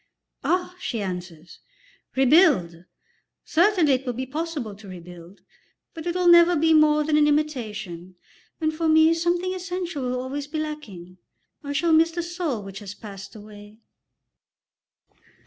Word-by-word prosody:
"Ah," 360 0 -1
she 230 - -3
answers, 180 -4 -7 0.6
"rebuild! 260 - +3 0.6
Certainly 345 -3 +3
it 260 0 0
will 250 -2 -3
be 255 +3 -4
possible 295 -5 -4
to 205 +1 -14
rebuild, 175 0 -12 0.5
but 325 +1 -7
it 345 - -2
will 360 -1 +1
never 345 0 +7
be 320 +1 +3
more 305 -1 +4
than 300 0 +1
an 300 0 +4
imitation, 215 - -3 0.4
and 315 -1 0
for 325 +1 -1
me 315 +1 +5
something 345 +2 0
essential 360 -4 -4
will 250 0 -2
always 275 +3 -5
be 310 +2 -5
lacking. 210 - -7 0.4
I 285 0 -4
shall 325 +3 +1
miss 325 +1 +5
the 340 +1 -4
soul 340 - -3
which 195 0 -8
has 205 -1 -9
passed 200 -2 -10
away." 210 0 -13
290 Hz, 145 wpm, -24 LUFS, 205-330 Hz, 0.6 s, never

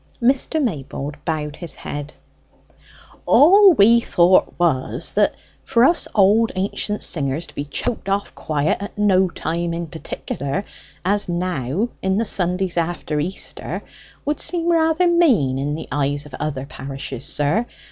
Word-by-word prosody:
Mr. 265 +5 +2
Maybold 145 - -3
bowed 150 -2 -3
his 170 -4 -5
head. 145 +1 -6 1.2
"All 390 +5 +7
we 230 -2 +6
thought 180 -4 +3
was, 160 -7 0
that - - +2 0.3
for 235 -3 +2
us 335 +6 +3
old 215 +3 +4
ancient 200 +2 -2
singers 145 +1 0
to - - -13
be 145 - -4
choked 195 - -3
off 200 +1 -1
quiet 150 -1 -1
at 200 - -7
no 190 -3 +3
time 170 0 -3
in 170 0 -3
particular, 160 +1 -5 0.4
as 205 0 +1
now, 175 - -1
in 190 0 0
the 225 - +1
Sundays 180 -2 -1
after 165 -2 -1
Easter, 180 +6 -4 0.4
would 295 0 -1
seem 345 -1 0
rather 325 +1 +3
mean 245 - +3
in 145 +2 -2
the 160 - -7
eyes 145 0 -1
of 150 - -14
other 140 -3 -3
parishes, 135 -2 -7
sir. 160 +12 0
175 Hz, 145 wpm, -21 LUFS, 145-225 Hz, 1.2 s, All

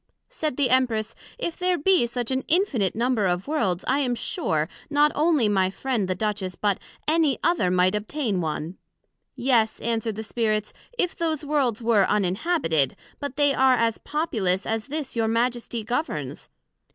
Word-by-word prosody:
said 310 - -3
the 270 -4 +2
Empress, 230 -4 +1 0.2
If 340 -9 -3
there 360 0 +1
be 350 -5 +3
such 240 +1 -3
an 260 0 0
Infinite 285 - +2
number 230 -3 +1
of 180 +4 -1
Worlds, 195 - 0
I 270 +2 +2
am 250 -4 0
sure, 160 - -1 0.2
not 295 0 +4
onely 300 -6 +3
my 190 -2 +2
friend, 230 -1 -2
the 185 - -1
Duchess, 195 -2 -2
but 205 0 0 0.3
any 310 -3 +3
other 335 - +2
might 180 +1 +3
obtain 210 -2 -1
one. 160 +2 -4 0.6
Yes, 235 -4 +2
answered 225 -2 -1
the 220 - -5
Spirits, 215 -2 -1 0.2
if 360 -5 0
those 315 -3 -1
Worlds 265 -6 0
were 220 -4 +4
uninhabited; 195 - +1 0.2
but 285 -2 -5
they 285 0 +3
are 265 -1 +4
as 230 -2 0
populous 215 - -1
as 225 0 -2
this 295 -2 -4
your 225 -1 +1
Majesty 235 0 -1
governs. 250 +9 -3
235 Hz, 165 wpm, -25 LUFS, 210-290 Hz, 0.6 s, not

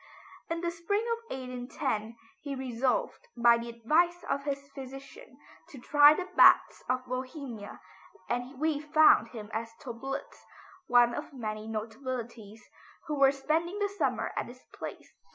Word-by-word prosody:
In 335 0 -2
the 345 -1 -1
spring 375 +6 -1
of 460 0 -4
1812 250 -3 -4 0.3
he 285 -2 -5
resolved 260 - -1
by 235 0 +5
the 235 0 -6
advice 320 +10 +1
of 280 0 -1
his 280 -1 -3
physician 275 - -11 0.3
to 280 - -11
try 290 +4 +6
the 370 - -4
baths - - +6
of 255 0 0
Bohemia, 255 -4 -6 0.5
and 245 +2 -3
we 310 -1 +1
find 305 -5 +5
him 220 -2 -9
at 225 +1 -3
Töplitz, 270 +3 -6 0.5
one 240 -1 +5
of 295 +3 -6
many 215 -4 -5
notabilities, 225 -1 -6 0.4
who 300 -2 -3
were 275 -1 +7
spending 320 +7 -1
the 410 -1 0
summer 400 - -1
at - - -2
this 250 +1 -14
place. - - -8
265 Hz, 145 wpm, -30 LUFS, 235-305 Hz, 0.5 s, were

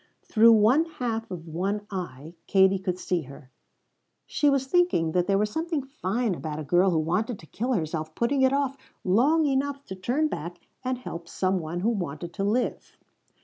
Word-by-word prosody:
Through 230 +1 +6
one 230 +9 +5
half 240 -8 -4
of 175 -3 -7
one 195 +6 -2
eye 165 -5 -6
Katie 190 0 +4
could 185 -1 -2
see 180 -1 -1
her; 135 -1 -13 0.7
she 295 - +2
was 275 -1 +1
thinking 265 - +2
that 180 +1 +1
there 195 -1 +3
was 210 +1 0
something 320 -1 -2
fine 240 -5 -2
about 155 -3 -5
a 155 - -4
girl 175 +6 +3
who 170 - +1
wanted 185 +9 0
to 160 - -14
kill 245 +10 -2
herself 155 -4 -3
putting 265 +4 +1
it 260 0 +5
off 275 -1 0 0.3
long 280 - +3
enough 280 0 -1
to 190 - -7
turn 250 +12 0
back 175 - -5 0.3
and 255 0 -1
help 170 -9 -7
some 185 +1 0
one 170 +2 -4
who 220 - +2
wanted 170 -6 -4
to 195 - -3
live. 225 +5 -1
200 Hz, 190 wpm, -26 LUFS, 175-260 Hz, 0.7 s, Through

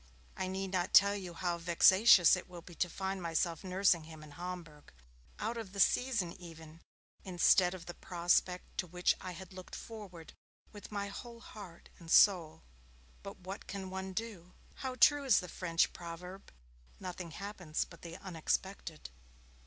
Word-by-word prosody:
I 185 - -3
need 190 0 -3
not 180 -2 0
tell 200 0 +7
you 180 -4 -7
how 175 -1 -2
vexatious 180 +2 +6
it - - -8
will 175 -2 -10
be 175 - -12
to 175 +1 -1
find 190 +2 -4
myself 170 0 -1
nursing 185 -3 +2
him 160 -1 -11
in 150 - -12
Homburg 165 -2 -8 0.5
out 230 +2 -3
of 215 -5 -7
the 200 - -6
season 210 -4 +2
even 165 -1 -12 0.4
instead 180 0 +4
of 170 -2 -10
the 175 - -7
prospect 175 +1 0
to 180 - -1
which 180 +1 +1
I 185 - -6
had 190 +2 -10
looked 185 -1 -9
forward 195 -7 -10 0.4
with 205 0 -11
my 200 -1 -3
whole 235 +3 -9
heart 195 -7 -12
and 165 - -12
soul. 170 - +5 0.6
But 195 -1 -10
what 190 +2 -8
can 190 -2 -6
one 190 0 -4
do? 185 -5 -6 0.2
How 260 -1 -5
true 290 +2 +5
is 260 -6 +5
the 180 - -6
French 170 -1 0
proverb, 180 +3 -9 0.5
'Nothing 180 -2 -6
happens 180 -2 -4
but 170 - -15
the 170 0 -8
unexpected'! 175 - -3
180 Hz, 165 wpm, -33 LUFS, 170-195 Hz, 0.6 s, tell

